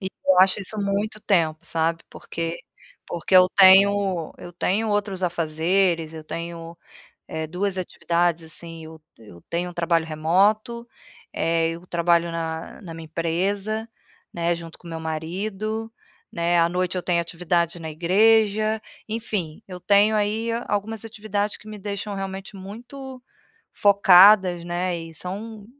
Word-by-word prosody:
E 190 - -3 0.2
eu 185 -1 +5
acho 190 +2 +4
isso 200 +3 -4
muito 205 +2 -1
tempo 165 -5 +1
sabe 165 0 0
porque, 165 0 -5 0.5
porque 175 +2 -2
eu 185 0 +7
tenho 195 -2 +5
eu 175 - -10
tenho 200 +5 0
outros 205 -2 -1
afazeres, 165 0 0
eu 160 - -7
tenho, 170 +1 -7 0.5
eh, 160 0 -4
2 190 +4 -2
atividades 170 -2 0
assim, 165 0 -7
eu 160 0 -12 0.2
eu 105 -6 -15
tenho 175 +1 -2
um - - -15
trabalho 170 -1 +1
remoto, 200 +10 +1 0.5
eh, 165 0 +1
eu 170 +2 -9
trabalho 170 0 +2
na 165 +1 -5
na 170 -4 -9
minha 165 0 -9
empresa, 195 +7 -2 0.5
né, 170 0 0
junto 165 -1 -10
com 175 - -13
o - - -8
meu 165 -1 -5
marido, 195 +8 -4 0.4
né, 170 0 +1
à 165 - +4
noite 180 +1 -1
eu - - -1
tenho 175 -2 +1
atividades 170 0 -1
na 160 -1 -6
igreja, 215 +5 +3 0.3
enfim, 210 -8 -4
eu 180 -2 -8
tenho 205 +3 +4
aí, 215 +2 0 0.2
algumas 210 +2 -2
atividades 210 -2 -3
que 215 - -17
me 215 0 -8
deixam 200 +1 -5
realmente 195 +1 -6
muito 245 +7 -9 0.5
focadas, 195 -2 +6
né, 175 +1 -2
e 165 -1 -10
são 205 +5 -7
180 Hz, 145 wpm, -23 LUFS, 165-205 Hz, 0.5 s, eu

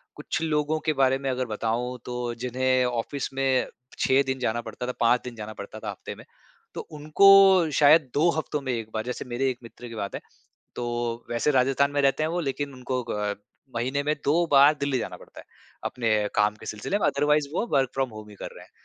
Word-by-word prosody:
कुछ - - -4
लोगों 155 -1 0
के 155 0 0
बारे 135 -1 +3
में 135 - -2
अगर 130 0 -1
बताऊँ 115 +3 -2
तो 125 0 -5 0.2
जिन्हें 130 0 +1
ऑफ़िस 125 +3 -3
में 135 -1 +1 0.3
6 135 +1 +4
दिन 130 0 -1
जाना 120 -1 -1
पड़ता 125 - -6
था, - - -1
5 120 0 +3
दिन 125 -2 -7
जाना 110 0 -7
पड़ता 105 +1 -9
था 110 - -5
हफ़्ते 100 - -7
में - - -14 0.5
तो - - -5
उनको 185 +3 +6
शायद 150 -1 +5
2 155 +4 +3
हफ़्तों 150 -2 -2
में 130 -2 -3
1 115 -2 -4
बार। 110 - -2
जैसे 125 +2 -4
मेरे 125 +2 -1
1 125 - -3
मित्र 120 +1 -11
की 115 - -9
बात 100 -2 -4
है, - - -5 0.5
तो 120 -1 -3
वैसे 120 +5 +1
राजस्थान 135 +1 +2
में 145 0 0
रहते 135 +2 +2
हैं 155 - +1
वो 175 +1 -1
लेकिन 140 -2 -3
उनको 125 0 -3
ग - - 0
अ, 105 -1 -1 0.4
महीने 130 +4 -1
में 150 +1 0
2 165 +4 +3
बार 145 +2 +7
दिल्ली 140 -2 0
जाना - - -5
पड़ता - - -16
है - - -18 0.4
अपने 120 -2 -2 0.3
काम 105 0 +2
के - - -13
सिलसिले 110 - -2
में। - - +1
अदरवाइज़ 145 0 +2
वो 230 - 0
वर्क 135 -1 +3
फ़्रॉम 135 -1 0
होम 110 0 -10
ही 105 - -12
कर - - -7
रहे - - -12
हैं। - - -23
130 Hz, 225 wpm, -26 LUFS, 120-145 Hz, 0.5 s, बार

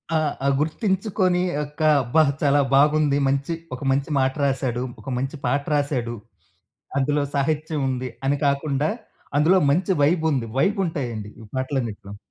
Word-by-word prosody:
ఆ! - - +4 0.3
ఆ! - - +3
గుర్తించికొనీ 185 +2 0 0.2
ఒక్కా 150 +1 0
అబ్బా! 155 +7 +3 0.2
చాలా 145 0 +4
బాగుంది. 150 0 +4
మంచి 140 +4 0 0.2
ఒక 125 - -12
మంచి 140 +2 0
మాట 130 0 +2
రాశాడు. 130 -3 -1 0.2
ఒక 135 - -8
మంచి 135 +4 -3
పాట 140 0 +1
రాశాడు. 130 -5 -1 0.8
అందులో 145 +1 +1
సాహిత్యముంది 140 -3 -1 0.2
అని 140 +1 +2
కాకుండా, 140 +1 +1 0.5
అందులో 165 +6 +5
మంచి 185 +6 +1
వైబుంది. 155 -5 +2
వైబుంటాయండి 140 - -1
ఈ 110 - -11
పాటలన్నిటిలో. 120 -7 -3
140 Hz, 125 wpm, -23 LUFS, 130-155 Hz, 0.8 s, అందులో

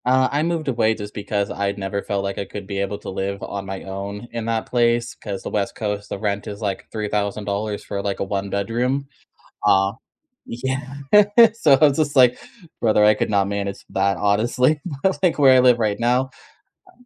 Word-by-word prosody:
Uh, 130 +1 +4
I 145 +1 +1
moved 165 -1 -1
away 115 -4 +2
just 105 -1 -8
because 100 -1 -2
I'd 100 0 -2
never 100 0 -3
felt 100 -1 -2
like 100 0 -3
I 100 - -3
could 100 0 -8
be 100 0 -4
able 100 +1 -2
to - - -8
live 100 +1 -4
on 100 -1 -5
my 95 0 -6
own 100 +3 -6
in 115 -1 -4
that 115 -1 -1
place 120 -1 +1
'cause 100 -3 -7
the - - -4
West 100 -2 -1
Coast, 105 -1 -4
the - - -4
rent 100 0 -2
is 100 -1 -6
like 100 -3 -3
$3,000 105 0 -2
for 100 -1 -4
like 100 -1 -3
a - - 0
one-bedroom. 105 +7 -2 0.6
Uh, 95 0 +4 0.5
yeah. 130 +3 -4 0.6
So 165 -11 +3
I - - +6
was 140 - -1
just 150 -2 0
like, 125 -2 +5 0.4
"Brother, 110 -2 +3
I 105 0 +6
could - - -2
not 100 -2 +2
manage 100 -1 -4
that 100 0 +1
honestly." 120 - +2 0.2
But 190 -1 +1
like 180 -4 +2
where 135 -2 +7
I - - +6
live 125 -1 +5
right 105 -2 0
now, 125 +3 +1 0.6
uh - - -20
105 Hz, 200 wpm, -21 LUFS, 100-125 Hz, 0.6 s, where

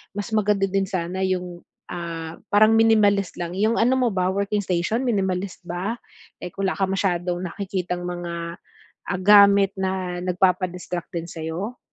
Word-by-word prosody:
mas 205 -1 -3
maganda 210 -2 +2
din 195 0 0
sana 185 0 -3
yung, 180 -2 -3 0.3
ah, 165 -2 -5 0.2
parang 215 +2 +6
minimalist 210 -4 +3
lang, 175 0 -4
yung 220 +3 +2
ano 245 +3 +3
mo 245 - +2
ba 185 -1 +1
working 200 +1 0
station 185 +7 0
minimalist 190 -4 -1
ba? 180 +6 -3 0.5
Eh, 180 - -5
kung 195 0 -1
wala 190 - -1
ka 195 - 0
masyadong 180 -2 -1
nakikitang 180 -1 -3
mga, 170 -1 -5 0.5
ah, 180 - -2
gamit 200 -1 +7
na 185 -2 -2
nagpapa-distract 180 -1 -1
din 170 -1 -3
sa'yo? 165 +9 -5
185 Hz, 150 wpm, -23 LUFS, 175-200 Hz, 0.5 s, gamit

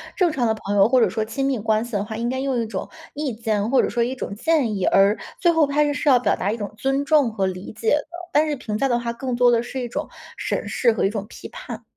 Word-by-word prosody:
正 360 -4 +2
常 250 -6 0
的 220 - +2
朋 205 -1 -4
友 195 +1 +6
或 255 0 +3
者 220 - +4
说 220 +3 -1
亲 250 +5 -2
密 265 -4 0
关 220 +1 +1
系 240 - -9
的 205 -2 -1
话， 220 +1 -6
应 235 +2 -2
该 260 +1 -2
用 265 -2 -1
一 - - -2
种 200 -4 -5 0.2
意 285 -4 -3
见 220 -1 -1
或 270 - +4
者 - - 0
说 240 - -1
一 245 +3 0
种 225 - -5
建 275 -4 +1
议， 190 - -1
而 195 +2 +4 0.2
最 345 - +5
后 325 -3 +3
他 290 +1 +2
是 290 - -4
要 255 -3 +6
表 - - +1
达 200 - -1
一 230 - -4
种 205 0 -6
尊 270 +4 0
重 290 -4 +3
和 195 -3 0
理 185 +2 -5
解 225 - -1
的， 295 - -6 0.2
但 305 +2 +3
是 295 - -1
评 220 -5 -4
价 275 - +1
的 240 -2 +1
话 235 -1 -3
更 250 +1 -4
多 245 0 +5
的 235 -1 +3
是 255 +2 -5
一 240 - -4
种 295 +6 -4 0.3
审 - - -3
视 235 -3 +2
和 - - -1
一 195 - +3
种 205 -2 -4
批 - - -10
判。 - - -8
240 Hz, 315 characters per minute, -22 LUFS, 215-275 Hz, 0.3 s, 友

